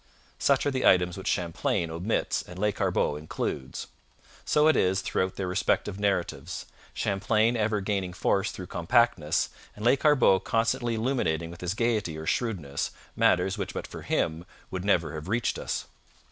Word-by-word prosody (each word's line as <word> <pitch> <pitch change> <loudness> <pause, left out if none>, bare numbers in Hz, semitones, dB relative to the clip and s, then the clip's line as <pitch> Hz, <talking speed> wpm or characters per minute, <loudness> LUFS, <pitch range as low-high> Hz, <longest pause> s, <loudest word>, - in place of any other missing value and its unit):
Such 140 -1 +3
are 145 - +2
the 130 -1 -1
items 90 -1 +4
which 95 +1 -7
Champlain 85 -1 0
omits 90 +7 -1
and 90 - -11
Lescarbot 100 -6 0
includes. 65 -4 -4 0.6
So 150 +1 +4
it 155 - +5
is 95 +1 +2
throughout 95 -1 -1
their 95 - -3
respective 95 +2 0
narratives 100 -4 -1 0.3
Champlain 110 +4 +1
ever 105 -2 +1
gaining 95 -2 -1
force 95 +2 +1
through 90 - -7
compactness, 90 -3 +2 0.3
and 105 - -6
Lescarbot 135 -6 +4
constantly 115 +1 +1
illuminating 110 -9 0
with 85 - -11
his 90 +2 -2
gaiety 110 -8 0
or 80 - -6
shrewdness 80 - -1 0.3
matters - - +2
which - - -4
but - - -3
for - - -9
him 80 +1 -1 0.3
would 95 -1 -3
never 90 -5 +2
have 80 +1 -6
reached 115 +4 0
us. - - -3
95 Hz, 155 wpm, -28 LUFS, 85-115 Hz, 0.6 s, it